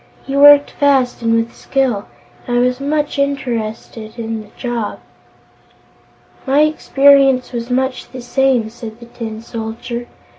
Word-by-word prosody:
He 275 - -4
worked 290 0 +7
fast 270 -4 +1
and 230 0 +2
with 230 0 -1
skill, 255 -7 -1 0.4
and 245 -1 0
I - - +4
was 250 +1 +1
much 290 +1 -1
interested 230 -5 -3
in 225 -1 -4
the 215 - -14
job." 240 -4 -3 1.5
"My 275 +3 +4
experience 275 -3 +3
was 235 0 -4
much 260 +1 -1
the 255 - -8
same," 245 -3 +1
said 230 -1 -9
the 235 - -11
Tin 225 -2 -7
Soldier. 230 +1 -6
245 Hz, 140 wpm, -17 LUFS, 230-275 Hz, 1.5 s, worked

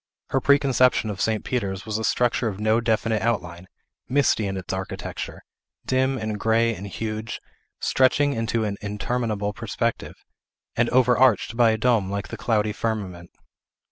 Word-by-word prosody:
Her 135 - +1
preconception 130 -5 +3
of 100 - -5
St. 110 -1 0
Peter's 100 -6 -2
was 110 -1 -2
a - - -3
structure 120 +2 +1
of 100 -2 -4
no 110 +2 +2
definite 110 -1 0
outline, 90 -6 -2 0.4
misty 130 -6 +2
in 95 0 -3
its 95 0 -5
architecture, 95 0 -5 0.4
dim 130 +1 +1
and 110 -2 -3
gray 115 +1 +2
and 100 0 -7
huge, 110 +2 -4 0.4
stretching 140 +2 +3
into 115 -1 -1
an 100 -2 -2
interminable 105 0 -2
perspective, 115 +1 -3 0.6
and 115 0 +2
overarched 125 -3 +3
by 120 -1 +5
a 110 - +1
dome 110 -4 +2
like 100 0 -4
the - - -5
cloudy 105 -3 0
firmament. 95 -6 -4
110 Hz, 150 wpm, -24 LUFS, 105-120 Hz, 0.6 s, by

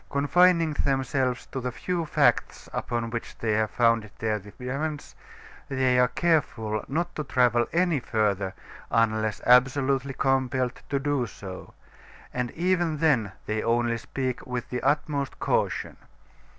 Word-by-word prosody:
Confining 165 +3 +3
themselves 135 -2 0
to 130 - -3
the 125 0 -2
few 170 +5 -3
facts - - +1
upon 115 -1 -2
which 115 -1 -5
they 115 - -1
have 110 0 +1
founded 115 -3 +2
their 110 -1 -1
defense, 135 +9 -5 0.6
they 130 -2 +2
are 125 - +5
careful 120 -10 0
not 170 +5 -2
to 150 - -2
travel 120 -3 +2
any 170 -3 +2
further 100 -5 -1 0.3
unless 110 -2 +1
absolutely 135 +2 +3
compelled 130 -2 0
to 140 - +1
do 140 -3 0
so, 95 -2 -10 0.6
and 125 -1 -1
even 175 -2 +1
then 135 - +2
they 110 0 -1
only 115 0 +1
speak 130 0 -3
with 125 -1 -4
the 125 - -2
utmost 140 0 0
caution. - - -1
125 Hz, 135 wpm, -26 LUFS, 115-145 Hz, 0.6 s, are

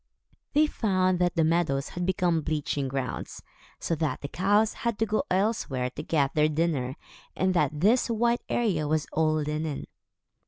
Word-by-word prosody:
They 300 +2 +5
found 185 -9 +1
that 175 0 +1
the 165 - +3
meadows 155 -4 +1
had 180 0 -4
become 175 -3 +1
bleaching 150 -2 -2
grounds, 130 -2 -4 0.4
so - - -2
that 150 -4 -1
the 140 - -4
cows 205 +7 +2
had 235 -3 -1
to 225 - +1
go 215 0 0
elsewhere 180 - 0
to - - -6
get 140 -4 0
their 155 -1 +3
dinner, 150 -5 -1 0.4
and 185 0 +1
that 150 -3 0
this 230 +7 +3
white 235 +1 +1
area 185 -11 0
was 155 0 +1
all 155 -1 +2
linen. 150 -1 -2
165 Hz, 165 wpm, -27 LUFS, 150-195 Hz, 0.4 s, They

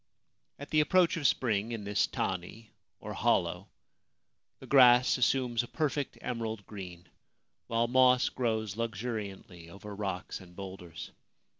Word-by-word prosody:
At 145 - -10
the 155 - +4
approach 175 +3 +3
of 150 -5 +2
spring 110 -2 0
in 110 -3 -5
this 100 0 +1
tani2 95 +4 -4 1.9
the - - -12
grass 125 -2 +6
assumes 125 0 +2
a 120 - -8
perfect 145 -1 -2
emerald 115 -4 -4
green, 90 -4 -9 0.6
while 115 +1 +1
moss 125 0 +4
grows 110 -5 -2
luxuriantly 105 -6 -5
over 100 +3 -9
rocks 95 -3 -4
and 90 -1 -15
boulders. 95 -4 -8
110 Hz, 120 wpm, -30 LUFS, 100-125 Hz, 1.9 s, grass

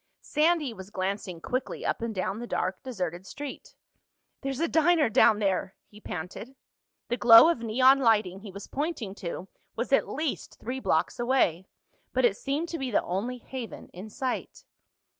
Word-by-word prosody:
Sandy 305 -4 +2
was 190 -2 -10
glancing 190 -3 -3
quickly 255 +9 -3
up - - -1
and 230 - -2
down 190 +2 -2
the 240 - -6
dark 185 -4 -2
deserted 185 -7 -4
street. 285 +4 -8 0.7
"There's 270 -2 -3
a 335 - +2
diner 320 -3 +3
down 215 - +5
there!" 195 -2 -1
he 210 0 -17
panted. 180 +10 -7 0.5
The 240 - 0
glow 230 +6 +9
of 340 - +1
neon 255 +4 +4
lighting 210 -7 +2
he 205 +1 -10
was 200 +1 -8
pointing 280 - -3
to 180 0 -5 0.3
was 240 +4 -2
at - - +3
least 305 0 -3
three 255 +3 -4
blocks - - 0
away, 240 -8 +1 0.5
but 260 -1 +3
it 215 -5 +3
seemed 285 +8 -2
to 330 - -4
be 265 -1 -2
the 215 - +2
only 220 +8 -3
haven 245 -1 -8
in 190 +5 -9
sight. 260 +2 -4
235 Hz, 170 wpm, -28 LUFS, 195-270 Hz, 0.7 s, glow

